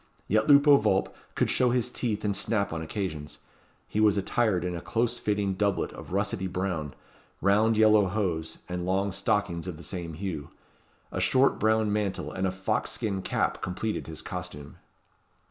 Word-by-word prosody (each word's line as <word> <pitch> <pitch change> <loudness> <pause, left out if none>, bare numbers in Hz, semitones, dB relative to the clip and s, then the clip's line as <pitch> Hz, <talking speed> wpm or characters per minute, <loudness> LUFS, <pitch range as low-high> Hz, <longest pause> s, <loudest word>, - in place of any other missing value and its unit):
Yet 110 +2 +2
Lupo 145 0 +7
Vulp - - +1 0.2
could - - +1
show 125 - +3
his 125 0 0
teeth 110 -5 -2
and 100 -1 +1
snap 100 -5 0
on 80 - -3
occasions. 80 -4 -4 0.5
He 105 - -2
was 105 -2 +4
attired 100 -2 +1
in 90 -1 -2
a 85 - -5
close 120 +3 0
fitting 105 -3 0
doublet 100 0 0
of - - -10
russety 100 0 -1
brown, 90 -6 -2 0.4
round 105 +3 +3
yellow 110 -2 +5
hose, 90 -5 -2
and 90 0 -3
long 95 +2 0
stockings 95 -3 -1
of 90 -4 -5
the 85 - -10
same 85 -4 -5
hue. 85 -5 -5 0.6
A - - -2
short 130 +1 +3
brown 110 -1 +2
mantle 105 -2 -2
and 95 +1 -1
a - - 0
fox 95 +1 -1
skin 100 -3 -2
cap - - -1
completed 105 +4 -3
his 80 -1 -7
costume. 90 -5 -7
100 Hz, 170 wpm, -28 LUFS, 90-110 Hz, 0.6 s, Lupo